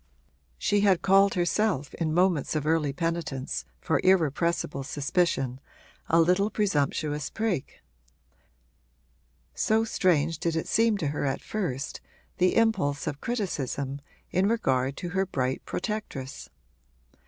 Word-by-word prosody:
She 205 -1 +1
had 195 -3 +3
called 195 +1 +5
herself 175 -4 0
in 160 -2 -1
moments 175 -3 +2
of 150 -1 -1
early 155 -2 +2
penitence 165 -4 -3
for 160 - 0
irrepressible 170 -4 +2
suspicion 135 -2 0 0.5
a 165 - +4
little 180 +5 +3
presumptuous 150 -7 0
prig: 220 -10 -2 1.8
so 220 - +2
strange 165 -7 +1
did 165 -1 -1
it 160 - -2
seem 225 -1 +3
to 155 -7 -1
her 145 - -3
at 135 - -2
first, 150 -11 -3 0.4
the 185 0 +3
impulse 195 -12 +2
of 145 - -4
criticism 140 - -3 0.3
in 185 +2 +2
regard 135 - +1
to 175 - -4
her 190 +1 0
bright 130 -6 -2
protectress. 210 - -5
165 Hz, 120 wpm, -27 LUFS, 140-195 Hz, 1.8 s, called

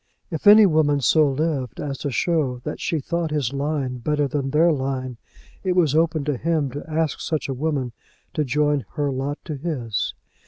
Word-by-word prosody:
If 160 +3 -2
any 210 +1 +9
woman 155 -5 +3
so 155 +2 +4
lived 135 -3 -2
as 140 -2 -4
to 145 - -2
show 145 -2 0
that - - -5
she 165 - 0
thought 170 +3 -2
his 145 -4 -1
line 140 -3 -2
better 150 +3 0
than 140 -1 -2
their 160 +4 +4
line, 130 -3 -2 0.5
it 185 -2 0
was 165 -6 +3
open 160 -2 +2
to 145 -3 -1
him 155 -2 0
to 145 +3 -6
ask 155 -2 -1
such 155 -2 -2
woman 135 -2 -1 0.4
to 155 - 0
join 145 +1 +1
her 145 -3 0
lot 135 +3 -3
to 155 - -4
his. 130 - -3
145 Hz, 185 wpm, -23 LUFS, 135-160 Hz, 0.5 s, any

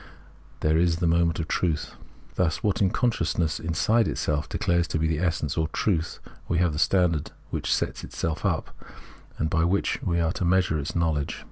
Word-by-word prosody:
there 80 +1 +3
is 85 -1 +3
the 85 - -1
moment 85 -1 +2
of 80 - -2
truth. 80 -3 -1 0.4
Thus 85 -3 +1
in - - -14
what 100 -2 +2
consciousness 85 -9 0
inside 105 +8 +2
itself 75 0 -1
declares 85 -1 +1
to - - -1
be 80 - 0
the 80 -1 0
essence 80 -5 -1
or 80 - +1
truth 85 0 -1 0.3
we 85 - 0
have 85 -3 +2
the 75 - -3
standard 85 -5 +2 0.2
which - - -3
itself - - 0
sets - - -5 0.2
up, - - -3 0.6
and 80 - 0
by 80 +1 +1
which 95 +4 +1
we 85 -2 0
are 80 0 +1
to - - -3
measure 90 -3 +2
its 70 - -4
l^TL0wledge. 80 -4 0
85 Hz, 190 wpm, -26 LUFS, 80-90 Hz, 0.6 s, there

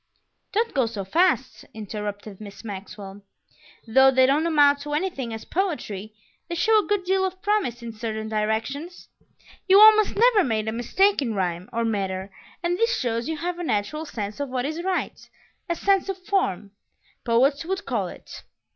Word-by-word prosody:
"Don't 455 +3 0
go 260 -4 +2
so 210 -4 -5
fast," 270 - +1
interrupted 210 -1 -6
Miss 200 0 -10
Maxwell. 200 -1 -8 0.6
"Though 265 +4 +5
they 260 0 +4
don't 290 +5 +2
amount 290 -3 +4
to 295 +1 -6
anything 295 -7 -2
as 225 0 -7
poetry, 220 - -3 0.3
they 340 - -3
show 430 +5 +3
a - - -11
good 410 -2 0
deal 380 +1 +1
of 375 0 -3
promise 395 - 0
in 230 -1 -6
certain 220 -1 -4
directions. 220 +10 -3 0.6
You 385 +1 +7
almost 430 -1 +7
never 455 -2 +5
make 220 -4 -1
a 220 - -2
mistake 340 - +2
in 230 -5 -2
rhyme 180 -1 -2
or 230 0 -1
metre, 195 -3 -2 0.3
and 350 +2 0
this 460 +1 +2
shows 235 +1 -2
you 320 - -2
have 350 +2 -3
a - - -3
natural 305 +5 -2
sense 210 -2 -5
of 285 -1 -3
what 250 0 -2
is 315 +3 -3
right; 375 -1 -3 0.4
a 340 - +1
'sense 390 +2 +1
of 385 - -2
form,' 280 - -1 0.5
poets 270 +5 +2
would 385 +4 -3
call - - -1
it. - - -11
265 Hz, 175 wpm, -24 LUFS, 215-360 Hz, 0.6 s, You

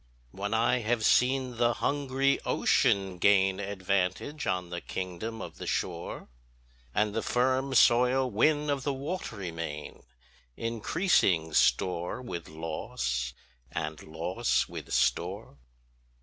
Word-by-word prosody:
When 100 +6 -4
I 120 +3 +2
have 115 -1 0
seen 130 -1 +3
the 120 0 +3
hungry 140 -1 +1
ocean 95 -2 +2
gain 95 0 +4
Advantage 100 +7 -1
on 90 -1 -1
the 85 0 -4
kingdom 95 +5 -5
of - - -9
the - - -6
shore, 85 -2 -3 0.6
And 105 +7 +1
the 115 - -1
firm 130 +3 +1
soil 125 +2 +5
win 145 +6 +2
of 140 -1 -1
the 140 +2 -1
watery 135 - -4
main, 80 -3 -6 0.6
Increasing 110 - +1
store 90 +2 +2
with 105 -10 -6
loss, 75 -6 -3 0.4
and 75 0 -4
loss 85 +9 -1
with - - -8
store. - - 0
105 Hz, 120 wpm, -29 LUFS, 90-125 Hz, 0.6 s, soil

